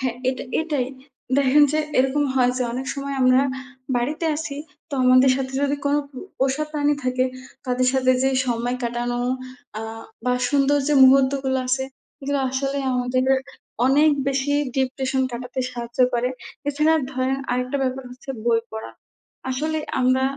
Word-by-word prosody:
হ্যা, 255 Hz, -3 st, 0 dB, 0.2 s
এটা 260 Hz, -, -2 dB, 0.2 s
এটাই। 295 Hz, -6 st, -1 dB, 0.5 s
দেখেন 280 Hz, +2 st, +5 dB
যে, 310 Hz, -, +1 dB, 0.2 s
এরকম 265 Hz, +3 st, +2 dB
হয় 250 Hz, -1 st, +4 dB
যে, 255 Hz, -, +1 dB
অনেক 260 Hz, +2 st, -4 dB
সময় 280 Hz, 0 st, -4 dB
আমরা 255 Hz, +1 st, +5 dB, 0.6 s
বাড়িতে 295 Hz, +7 st, -1 dB
আছি 295 Hz, -2 st, -5 dB, 0.3 s
তো 285 Hz, -, -5 dB
আমাদের 255 Hz, +1 st, +6 dB
সাথে 265 Hz, -1 st, -3 dB
যদি 285 Hz, 0 st, +1 dB
কোন 285 Hz, -, +2 dB, 0.2 s
পো 260 Hz, -, -10 dB, 0.2 s
পোষা 270 Hz, +3 st, +1 dB
প্রাণী 295 Hz, -1 st, +1 dB
থাকে 255 Hz, 0 st, +1 dB, 0.4 s
তাদের 250 Hz, 0 st, +1 dB
সাথে 255 Hz, -1 st, +3 dB
যে, 265 Hz, -, +3 dB, 0.2 s
সময় 240 Hz, +1 st, -1 dB
কাটানো 240 Hz, 0 st, -2 dB, 0.6 s
আ -, -, -4 dB, 0.4 s
বা 250 Hz, -, +2 dB, 0.2 s
সুন্দর 285 Hz, 0 st, +3 dB
যে, 295 Hz, -, +3 dB
মুহূর্তগুলো 265 Hz, 0 st, +4 dB
আছে 265 Hz, +1 st, +1 dB, 0.3 s
সেগুলো 285 Hz, 0 st, -2 dB
আসলেই 275 Hz, +1 st, -2 dB
আমাদেরকে 255 Hz, +1 st, +2 dB, 0.5 s
অনেক 295 Hz, +4 st, +5 dB, 0.2 s
বেশি 275 Hz, +1 st, 0 dB, 0.2 s
ডিপ্রেশন 265 Hz, 0 st, 0 dB
কাটাতে 250 Hz, +2 st, -4 dB
সাহায্য 235 Hz, -1 st, -8 dB
করে, 240 Hz, +1 st, +1 dB, 0.4 s
এছাড়া 305 Hz, +3 st, +3 dB, 0.2 s
ধরেন 260 Hz, +1 st, 0 dB
আরেকটা 250 Hz, +2 st, -1 dB
ব্যাপার 260 Hz, 0 st, -2 dB
হচ্ছে 255 Hz, +2 st, -10 dB
বই 230 Hz, -1 st, +3 dB
পড়া। 220 Hz, 0 st, -6 dB, 0.6 s
আসলে 310 Hz, +5 st, -1 dB, 0.2 s
আমরা 255 Hz, +1 st, +3 dB
265 Hz, 150 wpm, -23 LUFS, 255-280 Hz, 0.6 s, আমাদের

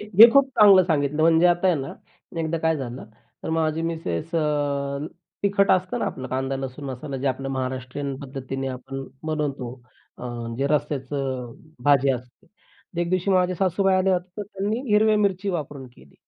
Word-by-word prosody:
हे -, -, -7 dB, 0.2 s
हे 235 Hz, -, +13 dB
खूप 275 Hz, 0 st, +5 dB
चांगलं 200 Hz, -3 st, +8 dB
सांगितलं, 150 Hz, -2 st, 0 dB
म्हणजे 165 Hz, +1 st, +5 dB
आता 175 Hz, +1 st, +3 dB
आहे 180 Hz, -, +4 dB
ना, 135 Hz, -, -6 dB, 0.5 s
एकदा 160 Hz, +1 st, -1 dB
काय 160 Hz, 0 st, +1 dB
झालं, 130 Hz, -2 st, -6 dB, 0.4 s
तर -, -, -4 dB
माझी 160 Hz, 0 st, 0 dB
मिसेस 165 Hz, 0 st, -3 dB
अ, 145 Hz, -3 st, 0 dB, 0.4 s
तिखट 200 Hz, 0 st, +3 dB
असतं 185 Hz, -1 st, +1 dB
ना, -, -, -1 dB
आपलं 130 Hz, -1 st, -5 dB
कांदा, 135 Hz, +1 st, -2 dB
लसूण 135 Hz, +2 st, -6 dB
मसाला 135 Hz, +1 st, -5 dB
जे 135 Hz, +2 st, -3 dB
आपलं 135 Hz, +1 st, -3 dB
महाराष्ट्रीयन 130 Hz, +1 st, -3 dB
पद्धतीने 135 Hz, -1 st, -5 dB
आपण 135 Hz, +1 st, -6 dB, 0.2 s
बनवतो. 145 Hz, -6 st, -2 dB, 0.5 s
अ, -, -, -11 dB
म्हणजे 120 Hz, +2 st, -3 dB
रस्याचं 135 Hz, -4 st, -2 dB, 0.3 s
भाजी 140 Hz, -1 st, +4 dB
असते. 125 Hz, -1 st, -6 dB, 0.5 s
एक 170 Hz, 0 st, -1 dB
दिवशी 185 Hz, +1 st, +1 dB
माझे 185 Hz, -1 st, +3 dB
सासूबाई 190 Hz, +2 st, +2 dB
आले 185 Hz, +1 st, +2 dB
होते, 180 Hz, -1 st, 0 dB
तर -, -, -1 dB
त्यांनी 205 Hz, +3 st, -3 dB
हिरव्या 215 Hz, +1 st, +4 dB
मिरची 200 Hz, -1 st, 0 dB
वापरून 145 Hz, -6 st, -5 dB
केली. 70 Hz, +1 st, -19 dB
150 Hz, 170 wpm, -24 LUFS, 135-180 Hz, 0.5 s, हे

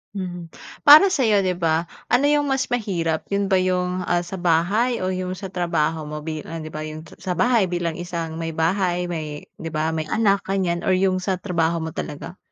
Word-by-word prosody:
Hmm, 180 Hz, -3 st, -5 dB, 0.4 s
para 310 Hz, +7 st, +10 dB
sa 265 Hz, -9 st, +2 dB
iyo, 205 Hz, -2 st, +3 dB
di 185 Hz, -, +1 dB
ba, 165 Hz, -2 st, +1 dB, 0.2 s
ano 245 Hz, +4 st, +3 dB
yung 290 Hz, -1 st, +2 dB
mas 270 Hz, -1 st, +1 dB
mahirap, 175 Hz, -9 st, -1 dB
yun 200 Hz, 0 st, -1 dB
ba 190 Hz, -, +5 dB
yung, 180 Hz, 0 st, -1 dB
ah, 175 Hz, 0 st, +1 dB
sa 180 Hz, +1 st, -7 dB
bahay, 185 Hz, +8 st, +1 dB
o 185 Hz, -, 0 dB
yung 185 Hz, 0 st, -3 dB
sa 190 Hz, -1 st, -7 dB
trabaho 160 Hz, -3 st, -1 dB
mo, 150 Hz, 0 st, -6 dB
bilang 160 Hz, 0 st, -5 dB
di 155 Hz, -, -8 dB
ba 155 Hz, -, -6 dB
yung 155 Hz, +1 st, -8 dB, 0.2 s
sa 180 Hz, -1 st, -3 dB
bahay 230 Hz, 0 st, +3 dB
bilang 175 Hz, -1 st, -2 dB
isang 165 Hz, -2 st, -4 dB
may 165 Hz, -1 st, -4 dB
bahay, 180 Hz, +2 st, +1 dB
may 155 Hz, -3 st, -5 dB, 0.2 s
di 165 Hz, -, -5 dB
ba 160 Hz, 0 st, -1 dB
may 155 Hz, -1 st, -3 dB
anak 200 Hz, -3 st, +2 dB
ganiyan, 185 Hz, -3 st, 0 dB
or 185 Hz, -, +4 dB
yung 185 Hz, 0 st, +2 dB
sa 185 Hz, 0 st, -1 dB
trabaho 170 Hz, -3 st, -1 dB
mo 160 Hz, -, -4 dB
talaga? 160 Hz, +5 st, -6 dB
180 Hz, 205 wpm, -22 LUFS, 165-195 Hz, 0.4 s, para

